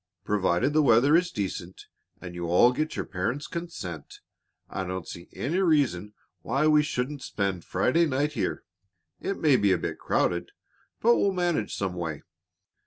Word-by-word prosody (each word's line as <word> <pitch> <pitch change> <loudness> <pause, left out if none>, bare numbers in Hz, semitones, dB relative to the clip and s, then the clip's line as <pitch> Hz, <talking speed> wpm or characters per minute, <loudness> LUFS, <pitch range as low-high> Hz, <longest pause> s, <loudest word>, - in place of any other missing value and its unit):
"Provided 100 +5 +1
the 155 - +4
weather 135 +2 +5
is 175 +1 +3
decent 95 - -5 0.3
and 90 -1 -8
you 85 -1 -4
all 90 +8 +5
get 155 +5 -2
your - - -3
parents' 115 +10 -3
consent, 165 - -7 0.5
I 95 - -4
don't 95 -1 -5
see 85 - -9
any 165 +8 -2
reason 135 - +1 0.3
why 135 +5 0
we 150 -1 +5
shouldn't 140 -1 -3
spent 95 -7 -2
Friday 165 - +2
night 145 +2 0
here. - - -2 0.6
It 195 - -3
may 145 -5 +4
be 100 -3 +3
a - - +3
bit - - -4
crowded, 85 0 0 0.5
but 235 +1 +5
we'll 200 - +2
manage 175 - -1
some 95 -2 -2
way." 80 -4 -5
125 Hz, 165 wpm, -27 LUFS, 90-155 Hz, 0.6 s, weather